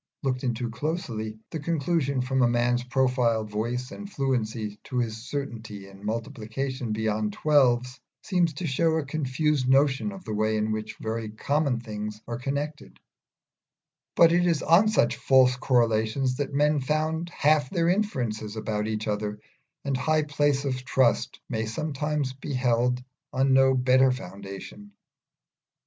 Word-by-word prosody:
Looked 130 Hz, -1 st, -1 dB
into 120 Hz, -1 st, -2 dB
closely, 115 Hz, -6 st, -3 dB
the 160 Hz, -, -3 dB
conclusion 150 Hz, -3 st, 0 dB
from 130 Hz, +1 st, 0 dB
a 120 Hz, -, +5 dB
man's 120 Hz, +1 st, +1 dB
profile, 125 Hz, -3 st, +1 dB
voice, 120 Hz, +5 st, -3 dB
and 205 Hz, 0 st, -8 dB
fluency 115 Hz, -, -2 dB
to 130 Hz, -, -4 dB
his 115 Hz, -3 st, 0 dB
certainty 115 Hz, -5 st, -6 dB
in 100 Hz, +1 st, -15 dB
multiplication 115 Hz, +2 st, -3 dB
beyond 105 Hz, -1 st, -1 dB
the -, -, -11 dB
twelves, 125 Hz, -4 st, +2 dB, 0.2 s
seems 175 Hz, -3 st, +1 dB
to 155 Hz, +5 st, -5 dB
show 160 Hz, +3 st, +2 dB
a 160 Hz, -3 st, -1 dB
confused 140 Hz, -1 st, 0 dB
notion 135 Hz, +7 st, +3 dB
of 195 Hz, -2 st, -10 dB
the 110 Hz, -, -4 dB
way 110 Hz, +1 st, +1 dB
in 110 Hz, 0 st, 0 dB
which 110 Hz, 0 st, -4 dB
very 110 Hz, 0 st, -3 dB
common 140 Hz, +4 st, 0 dB
things 105 Hz, -2 st, -6 dB
are 120 Hz, 0 st, -4 dB
connected; 145 Hz, +3 st, -4 dB, 1.2 s
but 165 Hz, -1 st, +7 dB
it 175 Hz, +1 st, +3 dB
is 165 Hz, -4 st, +1 dB
on 175 Hz, +6 st, +5 dB
such 215 Hz, -, +2 dB
false 130 Hz, -1 st, +4 dB
correlations 120 Hz, +1 st, +1 dB
that 145 Hz, 0 st, -2 dB
men 150 Hz, +1 st, +2 dB
found 155 Hz, +4 st, -1 dB
half 150 Hz, -4 st, +2 dB
their 170 Hz, -3 st, +1 dB
inferences 125 Hz, -, -1 dB
about 105 Hz, -1 st, -2 dB
each 110 Hz, 0 st, -3 dB
other, 105 Hz, 0 st, -2 dB, 0.5 s
and 140 Hz, -1 st, 0 dB
high 155 Hz, +4 st, +1 dB
places 145 Hz, -1 st, +1 dB
of 130 Hz, -2 st, -2 dB
trust 125 Hz, -2 st, +1 dB
may 110 Hz, -2 st, -2 dB
sometimes 150 Hz, +2 st, -2 dB
be 135 Hz, +1 st, -5 dB
held 125 Hz, 0 st, +1 dB, 0.3 s
on 135 Hz, +1 st, +2 dB
no 135 Hz, 0 st, +5 dB
better 130 Hz, +1 st, +4 dB
foundation. 100 Hz, -, -8 dB
130 Hz, 150 wpm, -26 LUFS, 110-145 Hz, 1.2 s, but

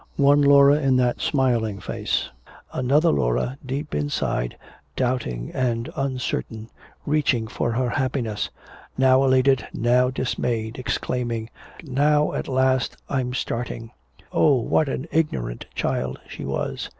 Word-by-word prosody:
One 145 Hz, +1 st, +5 dB
Laura 140 Hz, +1 st, +6 dB
in 135 Hz, -2 st, +3 dB
that 125 Hz, -1 st, +1 dB
smiling 120 Hz, -8 st, +1 dB
face; -, -, -2 dB, 0.4 s
another 145 Hz, +6 st, +3 dB
Laura 120 Hz, -, 0 dB
deep 140 Hz, +3 st, -4 dB
inside, 75 Hz, -4 st, -1 dB, 0.4 s
doubting 120 Hz, -, -2 dB
and 120 Hz, -2 st, -1 dB
uncertain, 125 Hz, -4 st, -3 dB, 0.3 s
reaching 145 Hz, -6 st, +1 dB
for 120 Hz, -, -2 dB
her 125 Hz, +2 st, 0 dB
happiness, 125 Hz, -5 st, -1 dB, 0.5 s
now 130 Hz, 0 st, +5 dB
elated, 130 Hz, 0 st, +3 dB
now 125 Hz, +2 st, +3 dB
dismayed, 120 Hz, -3 st, -2 dB
exclaiming, 120 Hz, -2 st, -2 dB, 0.3 s
"Now 150 Hz, +1 st, +2 dB
at -, -, -3 dB
last 130 Hz, -1 st, +1 dB
I'm 125 Hz, -2 st, -1 dB
starting!" 115 Hz, -2 st, -4 dB, 0.4 s
Oh, 145 Hz, -, +4 dB
what 135 Hz, +4 st, +1 dB
an 135 Hz, +3 st, -3 dB
ignorant 65 Hz, -, -1 dB
child 65 Hz, 0 st, -2 dB
she -, -, -7 dB
was. 70 Hz, 0 st, -3 dB
130 Hz, 120 wpm, -23 LUFS, 115-135 Hz, 0.5 s, Laura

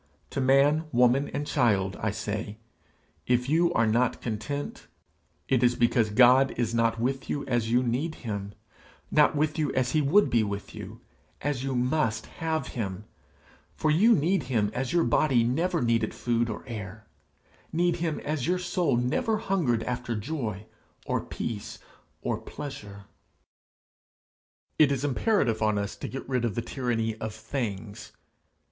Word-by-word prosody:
To 135 Hz, -, -2 dB
man, 140 Hz, +4 st, +4 dB
woman, 125 Hz, +3 st, +3 dB
and 145 Hz, -, -4 dB
child, 100 Hz, -8 st, +1 dB
I 110 Hz, -, +1 dB
say 105 Hz, +1 st, -4 dB, 0.7 s
if 125 Hz, 0 st, +2 dB
you 170 Hz, +4 st, +3 dB
are 115 Hz, -, +3 dB
not 115 Hz, +3 st, +1 dB
content, 120 Hz, +6 st, -5 dB, 0.6 s
it 130 Hz, -3 st, +2 dB
is 120 Hz, -1 st, +4 dB
because 120 Hz, -2 st, +2 dB
God 125 Hz, +4 st, +5 dB
is 115 Hz, -1 st, 0 dB
not 115 Hz, -1 st, +1 dB
with 130 Hz, +3 st, -2 dB
you 145 Hz, -, -2 dB
as 120 Hz, -3 st, 0 dB
you 120 Hz, +2 st, +3 dB
need 135 Hz, +7 st, -1 dB
him, 100 Hz, -2 st, -4 dB, 0.6 s
not 150 Hz, +1 st, +4 dB
with 155 Hz, +2 st, 0 dB
you 150 Hz, -3 st, +1 dB
as 130 Hz, -1 st, +1 dB
he 155 Hz, -, +2 dB
would 160 Hz, +9 st, +4 dB
be 115 Hz, -, +4 dB
with 100 Hz, -1 st, -4 dB
you, -, -, -9 dB, 0.4 s
as 140 Hz, -3 st, -2 dB
you 135 Hz, -1 st, -2 dB
must 125 Hz, -3 st, 0 dB, 0.2 s
have 160 Hz, -4 st, -1 dB
him; 100 Hz, -4 st, -4 dB, 0.7 s
for 155 Hz, -, +1 dB
you 215 Hz, +9 st, +5 dB
need 175 Hz, +5 st, +2 dB
him 105 Hz, -5 st, +1 dB
as 125 Hz, 0 st, -2 dB
your 170 Hz, -1 st, +3 dB
body 130 Hz, -6 st, +3 dB
never 165 Hz, +6 st, 0 dB
needed 115 Hz, -1 st, +1 dB
food 120 Hz, -1 st, 0 dB
or 110 Hz, -, -5 dB
air, 110 Hz, -3 st, -7 dB, 0.7 s
need 175 Hz, +1 st, +1 dB
him 165 Hz, -3 st, -2 dB
as 150 Hz, -2 st, -2 dB
your 180 Hz, +1 st, +2 dB
soul 175 Hz, -6 st, 0 dB
never 125 Hz, -, 0 dB
hungered 160 Hz, -, 0 dB
after 120 Hz, -1 st, -3 dB
joy, 110 Hz, -4 st, -4 dB, 0.4 s
or -, -, 0 dB
peace, 105 Hz, -3 st, -5 dB, 0.5 s
or -, -, -1 dB
pleasure. 105 Hz, -8 st, -8 dB, 1.8 s
It 150 Hz, -3 st, +6 dB
is 140 Hz, 0 st, -1 dB
imperative 140 Hz, -, +1 dB
on 110 Hz, -1 st, +2 dB
us 100 Hz, 0 st, -3 dB
to -, -, -5 dB
get 135 Hz, -, -7 dB
rid 130 Hz, -2 st, 0 dB
of 115 Hz, -4 st, -1 dB
the 120 Hz, -, -2 dB
tyranny 115 Hz, -3 st, -1 dB
of 110 Hz, -1 st, -5 dB
things. 110 Hz, -3 st, -5 dB
125 Hz, 160 wpm, -27 LUFS, 110-145 Hz, 1.8 s, It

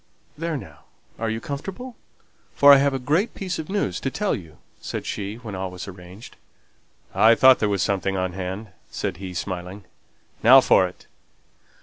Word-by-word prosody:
"There, 165 Hz, 0 st, -3 dB
now! -, -, -12 dB, 0.3 s
are 115 Hz, 0 st, -1 dB
you 110 Hz, 0 st, -2 dB
comfortable? 195 Hz, -, -7 dB, 0.6 s
for 140 Hz, 0 st, +8 dB
I -, -, +8 dB
have 140 Hz, 0 st, +2 dB
a -, -, 0 dB
great 155 Hz, -, 0 dB
piece 185 Hz, -4 st, -4 dB
of 160 Hz, -, -6 dB
news 190 Hz, -, -1 dB
to 135 Hz, -, -2 dB
tell 205 Hz, +8 st, -1 dB
you!" 80 Hz, -4 st, -8 dB, 0.2 s
said -, -, -5 dB
she, 100 Hz, +1 st, -4 dB
when 115 Hz, -3 st, -9 dB
all 95 Hz, 0 st, -4 dB
was 90 Hz, +1 st, -8 dB
arranged. 95 Hz, +3 st, -12 dB, 0.8 s
"I 115 Hz, +1 st, +5 dB
thought 130 Hz, +2 st, +6 dB
there 105 Hz, -, +1 dB
was 100 Hz, -3 st, 0 dB
something 95 Hz, -1 st, -1 dB
on 95 Hz, -1 st, -2 dB
hand," 95 Hz, +3 st, -5 dB, 0.2 s
said 95 Hz, -5 st, -4 dB
he, 95 Hz, -1 st, -8 dB
smiling. 90 Hz, +2 st, -5 dB, 0.6 s
"Now -, -, +8 dB
for -, -, +4 dB
it!" -, -, -15 dB
105 Hz, 180 wpm, -23 LUFS, 95-140 Hz, 0.8 s, for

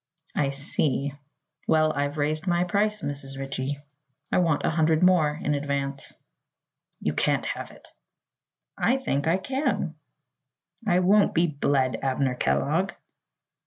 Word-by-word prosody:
"I 140 Hz, -2 st, +2 dB
see. 140 Hz, 0 st, -1 dB, 0.5 s
Well, 155 Hz, 0 st, +3 dB
I've 145 Hz, +1 st, -2 dB
raised 155 Hz, +4 st, -1 dB
my 175 Hz, 0 st, +3 dB
price, 210 Hz, +2 st, 0 dB
Mrs. 140 Hz, -1 st, -5 dB
Ritchie. 135 Hz, +1 st, -3 dB, 0.5 s
I -, -, +3 dB
want 165 Hz, -5 st, +2 dB
a -, -, +2 dB
hundred 160 Hz, +1 st, +2 dB
more 160 Hz, -5 st, +4 dB
in 150 Hz, -, 0 dB
advance." 140 Hz, -1 st, -3 dB, 0.8 s
"You -, -, -1 dB
can't -, -, +1 dB
have -, -, -4 dB
it." -, -, -16 dB, 0.9 s
"I 260 Hz, -, +2 dB
think 145 Hz, -, -1 dB
I 165 Hz, +3 st, +3 dB
can." 265 Hz, +9 st, -1 dB, 0.9 s
"I 180 Hz, -1 st, +4 dB
won't 200 Hz, +3 st, +4 dB
be 170 Hz, +1 st, +4 dB
bled, 140 Hz, -4 st, +1 dB
Abner 135 Hz, -1 st, 0 dB
Kellogg!" 70 Hz, -, 0 dB
150 Hz, 130 wpm, -26 LUFS, 140-175 Hz, 0.9 s, more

